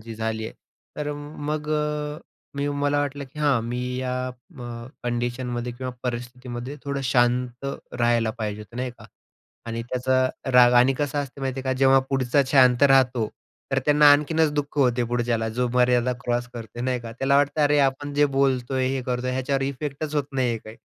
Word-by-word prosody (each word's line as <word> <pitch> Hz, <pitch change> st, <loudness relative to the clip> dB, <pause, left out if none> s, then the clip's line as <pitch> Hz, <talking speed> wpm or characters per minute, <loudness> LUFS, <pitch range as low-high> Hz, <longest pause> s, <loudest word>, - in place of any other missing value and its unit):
जी 115 Hz, +1 st, -8 dB
झाली 110 Hz, 0 st, -3 dB
आहे. 110 Hz, -, -7 dB, 0.4 s
तर 150 Hz, 0 st, -2 dB, 0.4 s
मग 150 Hz, 0 st, -2 dB
अ, 150 Hz, 0 st, -1 dB, 0.4 s
मी 140 Hz, +1 st, -1 dB
मला 145 Hz, 0 st, 0 dB
वाटलं 145 Hz, 0 st, -3 dB
की 150 Hz, -, -11 dB
हां 145 Hz, -6 st, +3 dB
मी 120 Hz, +1 st, -3 dB, 0.2 s
या 130 Hz, 0 st, -2 dB, 0.4 s
म 120 Hz, -1 st, -7 dB, 0.2 s
कंडिशनमध्ये 120 Hz, 0 st, -2 dB
किंवा 130 Hz, +1 st, -5 dB
परिस्थितीमध्ये 125 Hz, +2 st, -5 dB
थोडं 140 Hz, 0 st, -2 dB
शांत 125 Hz, +1 st, +1 dB, 0.3 s
राहायला 120 Hz, -2 st, +2 dB
पाहिजे 105 Hz, -1 st, -3 dB
होतं, 110 Hz, +3 st, -12 dB
नाही 125 Hz, 0 st, -2 dB
का. -, -, -13 dB, 0.6 s
आणि 115 Hz, 0 st, -3 dB
त्याचा 130 Hz, +1 st, +1 dB, 0.2 s
राग 125 Hz, -1 st, +7 dB
आणि 125 Hz, +2 st, +6 dB
कसं 145 Hz, 0 st, -1 dB
असतं 140 Hz, 0 st, -10 dB
माहिती 135 Hz, 0 st, -2 dB
आहे -, -, -11 dB
का, 130 Hz, -, +1 dB
जेव्हा 135 Hz, 0 st, +6 dB
पुढचा 135 Hz, +1 st, +2 dB
शांत 130 Hz, -1 st, +5 dB
राहतो, 130 Hz, -5 st, +4 dB, 0.4 s
तर 135 Hz, -, +3 dB
त्यांना 150 Hz, 0 st, +6 dB
आणखीनच 150 Hz, +1 st, +2 dB
दुःख 145 Hz, 0 st, -3 dB
होते 125 Hz, -3 st, +3 dB
पुढच्याला, 120 Hz, -1 st, -1 dB
जो 125 Hz, +2 st, -1 dB
मर्यादा 125 Hz, 0 st, +3 dB
क्रॉस 120 Hz, 0 st, -1 dB
करतो 115 Hz, +1 st, -7 dB
नाही 125 Hz, -1 st, -1 dB
का, 115 Hz, -1 st, -8 dB
त्याला 135 Hz, +3 st, +2 dB
वाटतं 145 Hz, +2 st, +2 dB
अरे 145 Hz, 0 st, +4 dB
आपण 140 Hz, +1 st, 0 dB
जे 145 Hz, 0 st, +4 dB
बोलतोय, 130 Hz, -1 st, +1 dB
हे 135 Hz, -1 st, -2 dB
करतोय, 125 Hz, 0 st, -1 dB
ह्याच्यावर 135 Hz, +1 st, -1 dB
इफेक्टच 145 Hz, +2 st, -4 dB
होत 145 Hz, -2 st, +1 dB
नाही 125 Hz, -3 st, +1 dB
काही. 110 Hz, +1 st, -12 dB
130 Hz, 180 wpm, -24 LUFS, 120-140 Hz, 0.6 s, राग